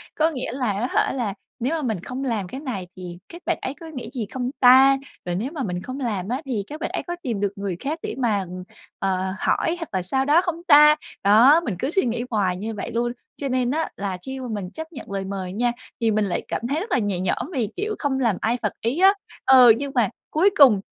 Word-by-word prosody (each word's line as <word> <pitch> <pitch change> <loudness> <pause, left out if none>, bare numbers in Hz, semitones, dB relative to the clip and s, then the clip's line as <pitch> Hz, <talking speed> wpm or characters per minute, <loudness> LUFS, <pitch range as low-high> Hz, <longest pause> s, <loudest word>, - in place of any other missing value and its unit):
Có 315 +1 +3
nghĩa 255 -5 -4
là 250 -4 -1
á 210 +6 -1
hả - - +2
là 235 -7 -2 0.3
nếu 255 +7 -1
mà 320 - -2
mình 220 -9 -1
không 260 +2 -5
làm 225 -8 -1
cái 260 +9 -7
này 215 - -4
thì 180 -2 -8
các 345 - -11
bạn - - 0
ấy 260 - -3
có 335 - -10
nghĩ 275 -6 -7
gì 240 -5 -3
không 250 -1 -2
ta? 265 +2 +7 0.3
Rồi 175 -1 -2
nếu 230 +10 -2
mà 305 -5 -4
mình 180 -4 -3
không 255 +6 -6
làm 210 -7 -2
á 255 +4 -1
thì 235 -7 -2
các 300 - -8
bạn - - -1
ấy - - -3
có 350 - -2
tìm 235 -6 -2
được 200 -1 0
người 195 -2 -3
khác 305 +4 -3
để - - -4
mà, 230 -6 +1
ừm, 185 0 -7 0.4
ờ, 190 -1 -1
hỏi 330 - +1
hoặc 330 - -6
là 185 - 0
sao 265 +10 0
đó 300 +5 +5
không 345 -2 -4
ta? 300 -1 +8 0.3
Đó, 240 +11 +7
mình 215 - -2
cứ 265 - -1
suy 360 -2 +1
nghĩ 235 0 -1
hoài 190 -4 +1
như 220 +4 -4
vậy 210 - -5
luôn, 240 +1 0 0.3
cho 280 - -3
nên 250 -1 +1
á 320 +2 -1
là 195 -2 -3
khi 265 0 -5
mà 255 - -5
mình 200 -4 -4
chấp 320 +1 -8
nhận 250 - -9
lời 195 -1 -3
mời 190 -2 -4
nha 240 +3 +1 0.3
thì 225 -1 +3
mình 215 0 +1
lại 185 - -1
cảm - - -3
thấy 290 +3 0
rất 415 +5 -6
là 255 - +3
nhẹ 205 -4 -1
nhõm 190 - -2
vì, 235 -8 -1
kiểu, 425 +1 -2
không 275 -3 0
làm 230 -6 +2
ai 230 +3 +1
phật 210 - -1
ý 245 +9 -1
á. 385 +1 +7 0.3
Ờ, 255 -3 +8
nhưng 280 +1 -4
mà 230 -6 +3 0.2
cuối 355 +6 +4
cùng 255 -9 +7
245 Hz, 265 wpm, -23 LUFS, 200-280 Hz, 0.4 s, ta